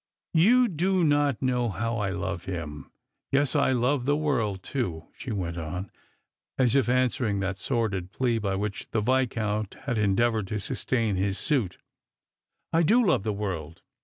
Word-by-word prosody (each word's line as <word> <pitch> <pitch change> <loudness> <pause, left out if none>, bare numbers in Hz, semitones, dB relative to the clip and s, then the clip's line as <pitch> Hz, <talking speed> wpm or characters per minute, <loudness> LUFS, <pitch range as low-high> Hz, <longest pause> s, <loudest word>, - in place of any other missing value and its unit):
" - - -63
You 250 +1 +6
do 185 0 +1
not 145 -4 +2
know 125 -2 +1
how 115 +5 -2
I 105 -2 0
love 90 -2 -3
him. 75 -6 -5 0.4
Yes, 140 0 +2
I - - +3
love 125 +1 +1
the 145 +2 +2
world 115 -11 0
too," 90 - -3
she 130 - -6
went 85 -5 -3
on, 90 +4 -5 0.7
as 125 -2 +3
if 135 -4 +3
answering 125 -4 +1
that 95 0 -2
Bordid 100 -8 -1
jjlea 120 -3 0
by 100 -2 0
which 100 +1 -4
the 110 - 0
Viscount 110 -4 0
had 120 -5 0
endeavoured 105 +1 +2
to 105 +2 -2
sustain 110 0 -1
his 95 +1 0
suit; 130 - 0 0.5
" - - -50
I 165 - +4
do 230 +9 +4
love 175 - +3
the 105 +2 -1
world. 90 -5 -4
110 Hz, 170 wpm, -27 LUFS, 95-130 Hz, 0.7 s, You